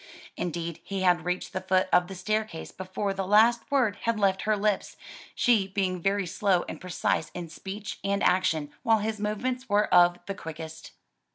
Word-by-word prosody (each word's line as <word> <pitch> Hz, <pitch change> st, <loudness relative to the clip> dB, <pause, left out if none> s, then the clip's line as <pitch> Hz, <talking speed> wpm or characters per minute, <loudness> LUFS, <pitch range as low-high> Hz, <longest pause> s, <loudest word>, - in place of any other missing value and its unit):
Indeed 170 Hz, -1 st, -4 dB
he 195 Hz, -1 st, -4 dB
had 175 Hz, -2 st, +3 dB
reached 180 Hz, +1 st, -2 dB
the 190 Hz, -, -2 dB
foot 185 Hz, 0 st, +2 dB
of 180 Hz, 0 st, +5 dB
the 195 Hz, -, -8 dB
staircase 215 Hz, -2 st, -2 dB
before 190 Hz, +2 st, -3 dB
the 195 Hz, 0 st, -2 dB
last 225 Hz, +3 st, +4 dB
word 245 Hz, -8 st, +2 dB
had 230 Hz, -1 st, 0 dB
left 190 Hz, -2 st, +2 dB
her 215 Hz, -, +3 dB
lips; 205 Hz, -1 st, -1 dB, 0.4 s
she 225 Hz, -6 st, +3 dB
being 190 Hz, -2 st, -1 dB
very 195 Hz, +1 st, +1 dB
slow 185 Hz, 0 st, +1 dB
and -, -, -7 dB
precise 175 Hz, -3 st, -1 dB
in 175 Hz, -2 st, -5 dB
speech 195 Hz, +5 st, -7 dB
and 200 Hz, 0 st, 0 dB
action, 160 Hz, -5 st, +1 dB
while 225 Hz, -3 st, +4 dB
his 215 Hz, 0 st, -3 dB
movements 245 Hz, +5 st, -2 dB
were 205 Hz, +1 st, +3 dB
of 175 Hz, 0 st, +6 dB
the 195 Hz, -, -3 dB
quickest. 160 Hz, -2 st, -9 dB
195 Hz, 180 wpm, -27 LUFS, 180-210 Hz, 0.4 s, of